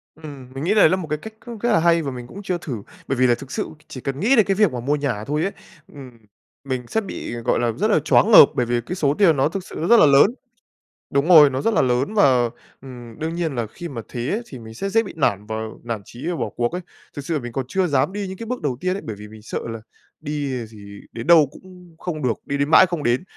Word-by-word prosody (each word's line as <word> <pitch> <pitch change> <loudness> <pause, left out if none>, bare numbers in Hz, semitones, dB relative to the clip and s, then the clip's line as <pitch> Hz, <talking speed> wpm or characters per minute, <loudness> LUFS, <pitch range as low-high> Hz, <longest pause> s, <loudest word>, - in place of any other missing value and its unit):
Ừm, 140 -5 -11
mình 135 +2 -5
nghĩ 185 +5 +2
lấy 210 -7 +6
là 185 - +2
một 180 -4 -6
cái 150 0 -2
cách 220 +8 -10
cũng 235 -2 -7
rất 240 +3 0
là 210 - +4
hay 170 0 +3
và 140 -3 -4
mình 125 -1 -8
cũng 195 +10 -10
chưa 185 -2 -1
thử, 125 -11 -6 0.2
bởi 135 - -1
vì 130 0 +4
là 120 - +3
thực 135 +2 -12
sự - - -2 0.2
chỉ 130 - -9
cần 135 +1 -4
nghĩ 235 +8 +3
đến 220 -5 +5
cái 195 - +1
việc 205 -4 +3
mà 125 - -3
mua 140 +5 0
nhà 135 -8 -2
thôi 150 +4 -1
ấy, 195 - -1 0.4
ừm, 135 -3 -10 0.5
mình 130 -3 -4
sẽ 220 - -1
bị, 195 - -6
gọi 120 - 0
là, 120 -1 +1
rất 205 - -1
là - - +4
choáng 220 - +3
ngợp 205 - +11
bởi 125 - +1
vì 120 0 0
cái 170 +10 -6
số 145 -6 +1
tiền 165 -4 +3
nó 135 - +2
thực 190 +2 -5
sự - - -11
nó 165 - -1
rất 235 - +7
là - - +7
lớn. 140 +2 +6 0.8
Đúng 140 +2 +1
rồi, 155 -5 +8
nó 130 0 -3
rất 225 - +1
là - - +3
lớn 130 - 0
và, 130 - +4 0.3
ừm, 120 -4 -11
đương 160 +2 -3
nhiên 165 -5 -2
là 120 -2 -2
khi 170 +10 -8
mà 130 -7 -6
thế 120 +2 -4
ấy, 220 - -1
thì 130 - -10
mình 110 -1 -11
sẽ 195 +12 -4
dễ 225 +3 +2
bị 200 - -9
nản 105 -10 0
và 110 +1 -5 0.3
nản 115 -3 -4
chí 120 +4 -9
và 175 - -1
bỏ - - -3
cuộc 120 0 -2
ấy. 180 +2 -4 0.3
Thực 145 -2 -7
sự 160 0 -1
mình 120 -2 -7
còn 130 +2 -3
chưa 185 +5 0
dám 140 +3 +1
đi 205 -1 -4
những 190 0 -7
cái 230 - -7
bước 250 +2 -4
đầu 130 -4 -2
tiên 185 0 0
ấy, 200 - -5
bởi 110 - -5
vì 105 +1 -11
mình 110 0 -13
sợ 105 - -5
là 115 0 -6 0.4
đi, 145 -4 -3
à, - - -8
gì 100 -2 -12
đến 115 +4 -7
đâu 165 -4 +7
cũng 180 -1 -16
không 160 -4 -5
được, 125 -3 +2
đi 140 - -2
đến 145 +1 0
mãi 175 - +8
không 170 -4 -4
đến. 120 +3 +1
145 Hz, 295 wpm, -21 LUFS, 125-180 Hz, 0.8 s, ngợp